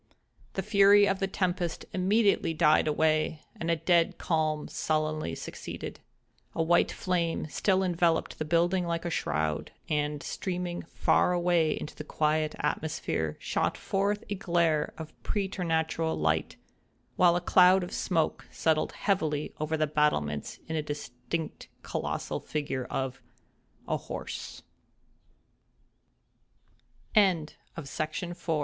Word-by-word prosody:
The 190 - -2
fury 200 0 +6
of 195 -1 0
the 195 - +1
tempest 180 -3 -1
immediately 195 -2 +2
died 155 0 +4
away, 155 0 +1 0.2
and 165 - -2
a 165 - +4
dead 170 0 +2
calm 155 -2 0
sullenly 155 - -1
succeeded. - - -7 0.6
A 165 - +2
white 170 +1 +3
flame 175 -3 -1
still 190 -1 +2
enveloped 170 -2 +1
the - - 0
building 175 +3 +2
like 170 0 -2
a 170 - -1
shroud, 75 - -1 0.2
and, 150 -1 -1
streaming 180 -2 -3
far 180 - +2
away 175 -3 +2
into 150 - -6
the - - -6
quiet 155 0 0
atmosphere, 150 - -2
shot - - -1
forth 200 +2 0
a - - -2
glare 170 -5 +1
of 160 -1 -8
preternatural 165 -5 -1
light; 75 +1 0 0.6
while 175 -1 +5
a - - +2
cloud 180 +1 +5
of 175 - -6
smoke 165 -3 0
settled 160 -1 +1
heavily 155 -7 0
over 155 +1 -1
the 155 - +2
battlements 140 - 0
in 160 - -4
the 155 - +1
distinct 145 +1 -5 0.2
colossal - - -3
figure 140 -4 -3
of—a 130 - -6
horse. - - -7 2.5
THE 215 - +8 0.6
SYSTEM 155 +5 -3
OF - - -18
D - - +1
165 Hz, 125 wpm, -29 LUFS, 150-180 Hz, 2.5 s, THE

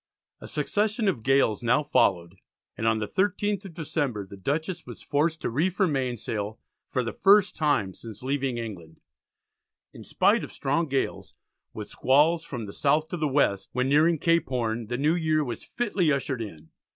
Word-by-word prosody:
A - - -9
succession 215 +1 0
of 140 -12 0
gales 135 -4 +2
now 125 +5 +2
followed 90 -9 +1 0.4
and 110 - -2
on 110 0 +3
the 105 -1 -3
13th 205 - 0
of 175 -4 -10
December 145 - -2
the 100 - -11
Dutchess 160 - -2
was - - -9
forced 155 +3 0
to - - -1
reef 170 +9 0
her 195 - +4
mainsail 120 - -2 0.3
for 130 - -1
the 115 - -4
first 200 0 +4
time 145 - +1
since 115 +2 -11
leaving 135 -2 -1
England. 95 -9 -7 0.9
In - - -11
spite - - +2
of - - -7
"strong 160 +5 -1
gales, 135 -1 -2 0.4
with - - -7
squalls 155 +5 +3
from 120 -8 -6
the 100 - -9
south 150 +2 +1
to 175 - -3
the 155 -2 0
west," 130 -9 +1
when 125 +1 0
nearing 160 +4 +4
Cape 165 +2 +2
Horn, 115 -3 -2
the 120 +2 -2
new 150 +4 +2
year 155 -3 +1
was 120 -5 -5
fitly 205 -9 0
ushered 135 -3 -1
in. 80 -8 -9
140 Hz, 180 wpm, -26 LUFS, 115-165 Hz, 0.9 s, her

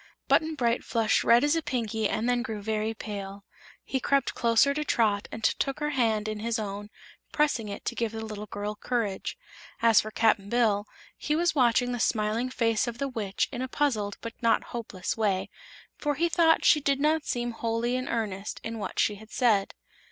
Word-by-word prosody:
Button 315 0 +2
Bright 240 -3 +1
flushed 225 -2 +1
red 235 +2 +5
as 295 +2 +3
a 330 - +1
Pinky 225 -7 -1
and 220 +2 -1
then 245 0 +2
grew 220 -3 -4
very 220 +1 -1
pale. 200 -2 -7 0.4
He 265 - -2
crept 275 0 +1
closer 235 +4 +3
to 300 +1 -2
Trot 210 -7 +1
and 225 - -7
took 275 +5 0
her 300 0 -1
hand 225 -6 +1
in 215 -1 -3
his 230 +2 -1
own, 205 -1 -5 0.4
pressing 285 -8 +1
it 200 - -7
to - - -1
give 230 -2 -2
the 220 0 -5
little 210 -1 -7
girl 205 +1 -4
courage. 215 -4 -2 0.4
As 230 -1 +5
for 215 - -6
Cap'n 215 -2 +2
Bill, 215 -3 +2 0.3
he 300 - 0
was 345 +2 +2
watching 245 -3 +3
the 245 - -3
smiling 220 +2 0
face 230 -2 +1
of 235 -1 -4
the 275 - -1
Witch 210 -6 -1
in 245 - -4
a 260 - -2
puzzled 230 -8 -1
but 230 0 -6
not 230 -1 +3
hopeless 215 -6 -4
way, 200 -4 0 0.5
for 295 -1 0
he 335 +4 +2
thought 325 -1 +3
she 300 - +6
did 275 -1 +1
not 305 +1 +2
seem 240 0 -1
wholly 230 +1 -1
in 255 0 -2
earnest 210 -3 -3
in 225 0 -5
what 205 - -5
she 205 - +2
had 220 +2 -14
said. 215 -6 +2
230 Hz, 200 wpm, -28 LUFS, 215-255 Hz, 0.5 s, she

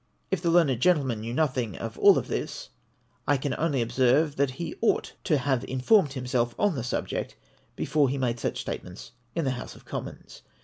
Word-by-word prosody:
If 190 -4 0
the 170 - +1
learned 165 -8 +4
gentleman 135 -8 +2
knew 115 +1 -4
nothing 130 - 0
of - - -5
all - - +8
this, - - -3 0.6
I 145 - +4
can 135 0 -2
only 145 -6 +1
ob 115 - -6
serve, 135 +4 +3
that 140 0 +2
he 155 +5 -5
ought 230 - +1
to 155 -6 +3
have 130 -1 0
informed 140 - +3
himself 125 -2 -1
on 205 -2 +2
the 130 -6 -3
subject 125 - -3 0.4
before 145 -3 +2
he 140 - -1
made 120 -3 -1
such - - -2
statements 90 +1 -7 0.2
in 165 - 0
the 135 - +1
House 125 - -6
of - - -17
Commons. - - -7
135 Hz, 190 wpm, -27 LUFS, 125-155 Hz, 0.6 s, all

